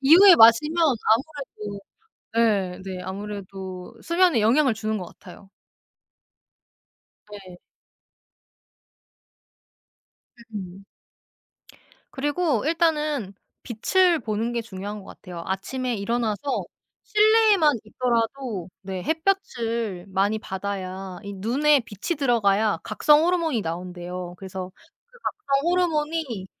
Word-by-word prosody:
이후에 345 +6 +8
마시면 230 +8 +6 0.3
아무래도 225 -5 -1 0.6
예. 200 -5 +1
네. 190 -1 -6
아무래도 190 -1 -7
수면에 345 -6 +3
영향을 250 +4 +3
주는 215 0 -2
것 180 - -6
같아요. 190 +2 -14 1.8
네. 190 -3 -11 3.0
음음. 190 -1 -7 1.3
그리고 290 -2 0
일단은 305 - 0 0.3
빛을 345 - +2
보는 225 +1 -2
게 235 -1 -2
중요한 205 -1 -7
것 - - -14
같아요. 175 -3 -9
아침에 245 +7 -2
일어나서 230 +5 -1 0.4
실내에만 425 - +4
있더라도 230 -3 -2
네 190 -1 -5
햇볕을 235 - -1
많이 195 +3 +1
받아야 190 -2 -5
이 200 -1 -7
눈에 270 +9 +3
빛이 230 - -4
들어가야 215 - +2
각성 295 +8 +4
호르몬이 335 -8 +1
나온대요. 180 0 -6
그래서 190 -1 -7 0.4
그 485 +1 -21
각성 285 -4 -1
호르몬이 310 - -1
225 Hz, 230 characters per minute, -24 LUFS, 195-300 Hz, 3.0 s, 이후에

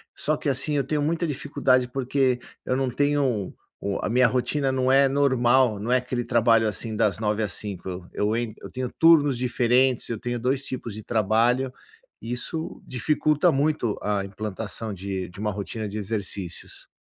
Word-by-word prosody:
só 155 0 0
que - - -5
assim, 140 +2 0
eu 140 - +2
tenho 150 -1 -1
muita 165 +3 0
dificuldade, 130 -3 +1
porque 130 -1 +1 0.3
eu 125 - 0
não 135 -1 0
tenho 135 -7 0 0.3
o 100 -1 -2
a - - -2
minha 125 +2 +4
rotina 130 +2 0
não 130 0 +1
é 135 +1 +6
normal, 130 -4 +3
não 115 +4 -3
é 130 - +5
aquele 125 -1 -2
trabalho 115 -1 +3
assim 110 +2 -2
das 105 -3 +1
9h 105 0 0
ás 105 - -2
17h, 95 -3 -5
eu 105 +2 0
en 115 -2 -3
eu - - -8
tenho 130 -1 -3
turnos 150 -5 +5
diferentes. 125 +1 +2
Eu 115 - -2
tenho 120 +1 -3
dois 130 +3 0
tipos 120 -4 -5
de 110 - -8
trabalho, 120 +4 +2 0.5
isso 125 +7 -5
dificulta 150 +6 +2
muito 140 -6 0
a 100 -1 -1
implantação 105 +2 -5
de 95 -1 -4
de 90 - -13
uma 105 0 -1
rotina 105 +2 -4
de 100 +1 -5
exercícios. 100 -4 -4
120 Hz, 175 wpm, -25 LUFS, 105-135 Hz, 0.5 s, é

